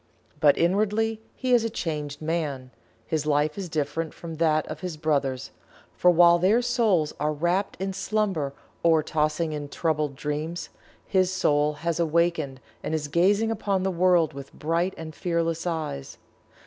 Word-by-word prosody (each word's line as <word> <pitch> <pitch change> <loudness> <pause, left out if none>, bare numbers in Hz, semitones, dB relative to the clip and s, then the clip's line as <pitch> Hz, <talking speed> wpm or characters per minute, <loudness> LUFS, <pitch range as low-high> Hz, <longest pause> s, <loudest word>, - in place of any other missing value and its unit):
But 145 -2 +5
inwardly 215 +5 +1
he 255 -1 0
is 240 -2 +5
a 230 - 0
changed 150 -7 -4
man 150 -6 -2 0.3
his 155 -2 -2
life 150 +1 +2
is 195 -3 -5
different 155 +1 -2
from 165 -2 -8
that 155 -1 +2
of - - -7
his 180 -4 -5
brothers, 140 -4 -1 0.4
for 180 - +4
while 175 0 +6
their 210 +7 +3
souls 215 -11 +2
are 150 +1 +1
wrapped 175 +6 -1
in 190 0 -2
slumber 195 -8 -1 0.3
or 165 -2 +4
are - - -10
tossing 155 +1 0
in 145 -1 -5
troubled 150 -3 -1
dreams, 150 +4 -4 0.4
his 185 -2 +2
Soul 150 -5 +2
has 170 0 0
awakened 165 -4 +1 0.2
and 160 - -2
is 150 -2 -3
gazing 200 +8 +3
upon 200 -3 -1
the 190 - +1
world 175 -3 +3
with 140 0 -9
bright 170 +4 -1
and 160 -1 -7
fearless 165 -1 -1
eyes. 155 - -4
165 Hz, 160 wpm, -26 LUFS, 150-185 Hz, 0.4 s, while